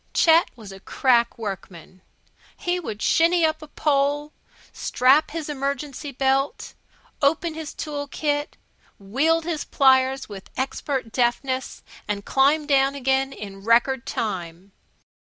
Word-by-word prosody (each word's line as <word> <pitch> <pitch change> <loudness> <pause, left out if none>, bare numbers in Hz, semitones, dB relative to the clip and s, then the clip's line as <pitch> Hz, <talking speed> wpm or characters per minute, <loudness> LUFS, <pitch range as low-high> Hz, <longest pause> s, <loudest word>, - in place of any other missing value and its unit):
Chet 330 +1 +5
was 215 -4 -11
a 195 - -11
crack 235 +2 +1
workman. 185 -4 -8 0.6
He 355 0 -1
could 220 -10 -6
shinny 335 +1 +3
up 315 0 -1
a 310 - -10
pole, 290 0 0 0.4
strap 275 +5 +3
his 320 -1 -5
emergency 280 0 -4
belt, 270 +1 0 0.5
open 315 +3 +1
his 315 -1 -6
tool 290 -1 -5
kit, 290 +1 -2 0.4
wield 280 +12 +1
his 330 -3 -2
pliers 265 0 +3
with 195 -2 -10
expert 265 -2 -3
deftness, 255 +2 -1 0.2
and 200 -1 -3
climb 285 +3 +3
down 275 -1 +2
again 270 0 0
in 195 -5 -9
record 235 +3 +2
time. 185 -3 -4
270 Hz, 125 wpm, -23 LUFS, 235-300 Hz, 0.6 s, Chet